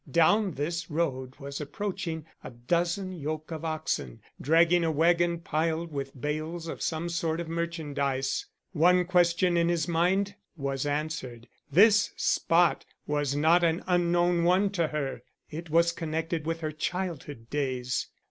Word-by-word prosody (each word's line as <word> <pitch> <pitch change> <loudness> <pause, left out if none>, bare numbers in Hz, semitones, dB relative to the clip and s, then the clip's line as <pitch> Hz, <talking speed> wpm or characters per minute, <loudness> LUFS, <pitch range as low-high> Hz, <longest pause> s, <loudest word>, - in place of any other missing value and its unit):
Down 190 +4 +3
this 165 +4 -3
road 130 -5 -2
was 140 +1 -7
approaching 165 0 -4 0.2
a - - -7
dozen 170 +10 -1
yoke 155 -2 -5
of 160 -1 -5
oxen 155 - -3 0.2
dragging 170 +4 +4
a 165 - +1
wagon 170 +2 +3
piled 165 +1 -1
with 135 -2 -5
bales 155 +4 -3
of - - -6
some 160 +1 -2
sort 165 -1 -1
of 170 - -4
merchandise. 145 -5 -2 0.2
One 180 +1 +4
question 175 0 +3
in 170 0 +3
his 170 -2 0
mind 185 +4 +1 0.2
was 140 -1 -2
answered. 145 -5 -3 0.2
This 210 +6 +5
spot 170 0 +2 0.2
was 145 -2 -1
not 160 +4 +4
an 165 0 +1
unknown 175 -1 +2
one 185 +3 +3
to 170 -5 0
her. 140 -5 -3 0.3
It 165 +2 -7
was 170 +2 +4
connected 165 -1 -3
with 165 0 -2
her 155 -1 -2
childhood 155 -7 -4
days. 130 -3 -1
165 Hz, 145 wpm, -28 LUFS, 150-175 Hz, 0.3 s, This